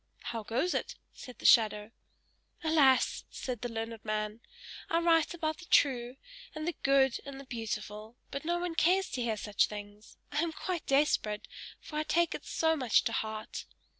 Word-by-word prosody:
"How 225 - -3
goes 245 - 0
it?" - - -2 0.2
said 250 - -11
the - - -11
shadow. 215 -1 +5 0.7
"Alas!" 295 -5 +4
said 250 -4 -5
the 245 - -3
learned 225 -1 -5
man. 215 +1 -2 0.5
"I 330 - +2
write 335 -1 +3
about 315 -2 -2
the 355 - -12
true, 250 -3 +3 0.4
and 310 +1 -4
the 345 - 0
good, 270 -2 +3
and 275 -1 -8
the 275 - -10
beautiful, 220 -2 -5
but 275 - -4
no 345 +2 0
one 350 -1 -2
cares 365 +4 +2
to 255 - -2
hear 225 -2 -1
such 210 -1 +1
things; 205 0 -10
I 295 +1 +1
am 335 -1 -1
quite 355 0 -4
desperate, 245 -7 +1 0.3
for 300 - -7
I 305 - +1
take 340 +2 +2
it - - -7
so 320 0 +2
much 255 -6 +3
to - - -1
heart!" 220 0 -4
260 Hz, 180 wpm, -31 LUFS, 220-320 Hz, 0.7 s, shadow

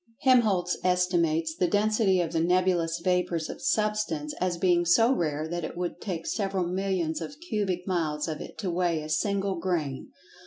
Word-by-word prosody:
Helmholtz 210 -9 +3
estimates 170 -3 +1
the 180 - +1
density 205 -1 +2
of 165 -2 -2
the 165 - +1
nebulous 175 -1 +1
vapors 180 -3 0
of - - -10
Substance 210 -9 0
as 180 -1 0
being 175 -1 +3
so 225 +9 +4
rare 155 - -1
that 175 +1 -4
it 165 - -6
would 175 -1 -4
take 170 -5 -4
several 195 -3 -1
millions 180 -3 -1
of 285 - -7
cubic 200 - -2
miles 160 -5 -1
of 155 -1 -4
it - - -9
to 190 -5 -2
weigh 170 -3 0
a 155 - -7
single 195 +2 0
grain. 160 -7 -2
180 Hz, 170 wpm, -27 LUFS, 165-195 Hz, -, so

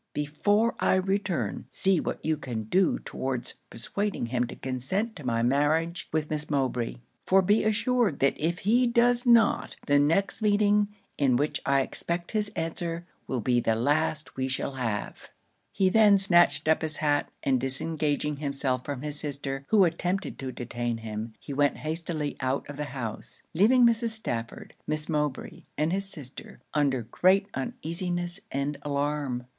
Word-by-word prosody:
Before 205 +10 +1
I - - +3
return, 190 -1 -1
see 190 -3 +3
what - - -4
you 160 0 +2
can 120 -6 -5
do 180 - +2
towards 130 -2 -3 0.2
persuading 200 - -3
him 120 +1 -1
to - - -8
consent 135 - -2
to 150 - -9
my 115 -2 0
marriage 155 +6 +1
with 155 -1 0
Miss 150 0 -3
Mowbray; 130 - -1 0.3
for 190 0 +5
be 205 +4 +3
assured 220 - +1
that 140 - +3
if 170 +3 -1
he 240 +4 +4
does 240 +1 +3
not, 235 -2 +4
the 145 -1 +4
next 180 +8 +2
meeting, 205 0 +3 0.3
in 135 -4 +3
which 145 +4 0
I 140 0 +4
expect 170 +5 -3
his 210 -1 0
answer, 165 +1 -3 0.2
will 130 -3 -2
be 120 +2 +2
the 115 -1 +1
last 150 +5 0
we 130 0 -1
shall 130 +1 -2
have.' 120 -6 -4 0.4
He 190 - +2
then 205 0 +6
snatched 175 -4 +4
up 160 - +3
his 155 -1 0
hat, 145 -1 +1
and 130 -2 +2
disengaging 150 +1 -1
himself 140 -3 -1
from 140 -1 -5
his 150 0 0
sister, 140 -2 -3
who 210 -3 +5
attempted 180 +3 -1
to 130 -1 -4
detain 120 -1 -3
him, 110 0 -6
he 145 - -7
went 145 0 +2
hastily 155 0 -3
out 130 +1 -1
of 145 - -8
the 150 - -3
house; 125 -6 -6
leaving 235 +8 +5
Mrs. 230 0 +2
Stafford, 115 - -4
Miss 155 0 -1
Mowbray, 150 -4 -3
and 155 +3 +1
his 195 0 0
sister, 145 -8 -7
under 140 -5 +1
great 190 - +2
uneasiness 175 +5 -3
and 140 +2 -2
alarm. 140 -3 -2
150 Hz, 160 wpm, -27 LUFS, 135-190 Hz, 0.4 s, then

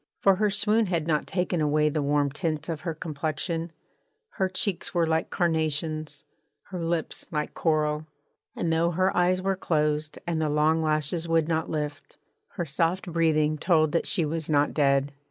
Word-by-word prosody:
For 195 -1 +4
her 210 +1 +2
swoon 210 +2 +2
had 170 -4 -1
not 155 -2 0
taken 180 -2 -1
away 150 0 +2
the 150 0 0
warm 145 0 +1
tints 155 +1 -3
of 160 -3 -3
her 165 -3 -3
complexion: 160 +2 -3 0.6
her 190 -1 -1
cheeks 185 -1 -2
were 170 -1 +3
like 160 0 0
carnations, 155 -2 -1 0.5
her 180 -3 -4
lips 165 -1 -2
like 150 -1 -3
coral: 155 -1 0 0.5
and 165 -1 0
though 165 +1 +2
her 185 +3 +1
eyes 180 +1 +2
were 195 0 +1
closed 150 -3 0
and 165 -2 -1
the 155 - +1
long 155 +2 +2
lashes 155 +2 0
would 165 -1 +2
not 160 -1 -1
lift, 150 -2 -4 0.4
her 175 - -3
soft 170 +4 -1
breathing 155 -2 +2
told 155 -3 +3
that 170 - 0
she 170 -5 +1
was 160 +1 -2
not 145 -1 +2
dead. 140 -1 +2
160 Hz, 170 wpm, -26 LUFS, 150-175 Hz, 0.6 s, For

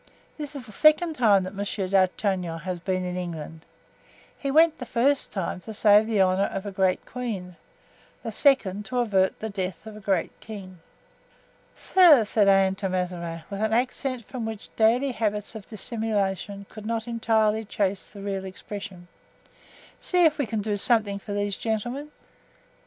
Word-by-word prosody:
This 295 -1 -7
is 265 -3 -7
the 220 - -12
second 310 - +4
time 215 -8 +4
that 185 +2 -6
Monsieur 200 -1 -3
d'Artagnan 185 -2 +1
has 185 -2 -4
been 185 +1 -2
in 180 0 -3
England. 160 -3 -6 0.7
He 275 - -4
went 320 +3 +4
the 250 - -5
first 270 +5 +1
time 190 -2 -3
to 220 +3 -9
save 210 0 +5
the 220 -3 0
honor 190 +1 +3
of 195 +1 -4
a 205 - -4
great 190 -1 +1
queen; 205 -8 -5 0.7
the - - -4
second, 210 -9 +2
to 250 +6 -4
avert 195 -6 +2
the 220 - -4
death 190 0 -4
of 220 -1 -9
a - - -9
great 195 -4 0
king." 190 -5 -10 1.0
"Sir," 330 - +6
said 205 -1 +2
Anne 195 -1 +5
to 195 -1 -2
Mazarin, 175 -3 -3
with 200 +1 -4
an 220 0 +1
accent 250 0 -1
from 255 -3 -6
which 220 -1 -7
daily 240 +5 +3
habits 210 -3 -2
of 220 -3 -9
dissimulation 205 -3 -2
could 215 -1 -10
not 230 0 -2
entirely 220 -2 +1
chase 200 -2 -2
the 200 - -12
real 195 -1 -3
expression, 190 -1 -8 0.9
"see 360 -2 +3
if 310 -1 +3
we 280 - 0
can 220 -1 -2
do 210 -1 -1
something 205 -2 +2
for 205 +1 -7
these 205 -1 -1
gentlemen." 240 +8 -3
210 Hz, 170 wpm, -25 LUFS, 190-230 Hz, 1.0 s, Sir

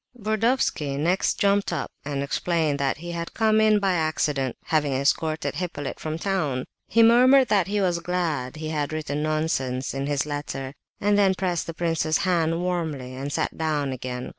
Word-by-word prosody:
Burdovsky 215 - 0
next 175 +6 +1
jumped 200 -1 +2
up 155 -5 -2 0.2
and 140 -1 -2
explained 155 0 0
that 135 -1 0
he 175 +2 -7
had 170 0 -5
come 220 -1 +3
in 215 -1 +5
by 195 -2 +1
accident, 150 -5 0
having 150 -3 +1
escorted 155 +4 0
Hippolyte 145 -4 -4
from 155 0 -3
town. 155 -9 -1 0.2
He 230 - +4
murmured 255 +3 +6
that 195 -4 +3
he 205 +1 0
was 175 -3 +1
glad 165 -7 -2
he 155 0 -5
had 150 -2 -2
"written 150 -2 -3
nonsense" 150 -5 -1
in 135 0 -3
his 145 -1 0
letter, 145 -2 -5 0.3
and 205 0 +2
then 195 -2 +4
pressed 180 -4 -1
the 165 - -6
prince's 165 -2 +1
hand 170 -2 +1
warmly 160 -8 -2
and 135 +2 -5
sat - - -1
down 150 -3 -1
again. 125 -1 -5
160 Hz, 175 wpm, -25 LUFS, 145-185 Hz, 0.3 s, murmured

